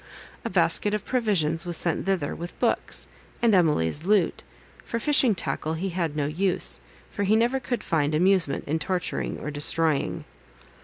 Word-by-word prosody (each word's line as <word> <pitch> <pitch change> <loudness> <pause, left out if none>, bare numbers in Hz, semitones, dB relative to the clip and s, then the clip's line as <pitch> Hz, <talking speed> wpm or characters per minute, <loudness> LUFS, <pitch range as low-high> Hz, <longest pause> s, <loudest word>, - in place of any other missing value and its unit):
A - - -3
basket 210 0 +2
of 210 - -5
provisions 180 -10 0
was 175 -2 0
sent 170 +2 -1
thither, 185 -7 0
with 170 +1 -8
books, - - -1 0.3
and 235 -2 +3
Emily's 150 - +2
lute; 195 -2 +2 0.4
for 230 - -3
fishing 255 -2 +3
tackle 155 0 -2
he 190 +4 -2
had 170 -4 -2
no 145 -2 0
use, 155 - 0 0.3
for - - -4
he 205 +2 +3
never 240 +4 +2
could 245 -3 -3
find 150 -2 0
amusement 180 -4 +3
in 160 +3 -1
torturing 180 +2 -2
or 150 - -5
destroying. 150 +1 +1
175 Hz, 160 wpm, -25 LUFS, 155-205 Hz, 0.4 s, and